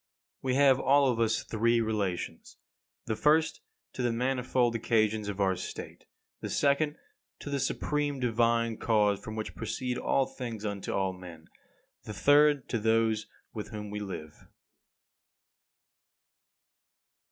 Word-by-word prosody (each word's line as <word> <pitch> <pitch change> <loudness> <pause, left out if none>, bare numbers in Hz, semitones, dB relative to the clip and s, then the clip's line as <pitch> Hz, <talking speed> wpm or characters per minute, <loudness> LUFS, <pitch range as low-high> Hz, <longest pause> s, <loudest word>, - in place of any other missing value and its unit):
27. 130 0 0
We 140 - +6
have 130 -1 +5
all 140 -1 +4
of 115 - -3
us 110 -1 +1
three 115 +1 +1
relations: 105 -5 -3 0.5
the 110 - -1
first 155 +6 +2 0.3
to - - -4
the 120 -1 +1
manifold 125 0 +1
occasions 110 -2 +1
of 100 0 -5
our 95 -1 +2
state; - - -8 0.3
the - - -5
second 145 +1 +2 0.4
to 145 - -8
the 140 - 0
supreme 145 +1 -1
divine 115 -1 +1
cause 105 -3 +2
from 110 - -7
which 110 -1 -4
proceed 125 -1 -3
all 135 - +2
things 115 -6 -6
unto 100 -2 -3
all 95 -1 0
men; 85 -3 -12 0.6
the 110 - -6
third 145 +2 +4
to 115 - 0
those 110 0 +1 0.3
with 105 - -5
whom 105 -1 -7
we 105 - -4
live. 90 -7 -8
115 Hz, 140 wpm, -29 LUFS, 105-130 Hz, 0.6 s, We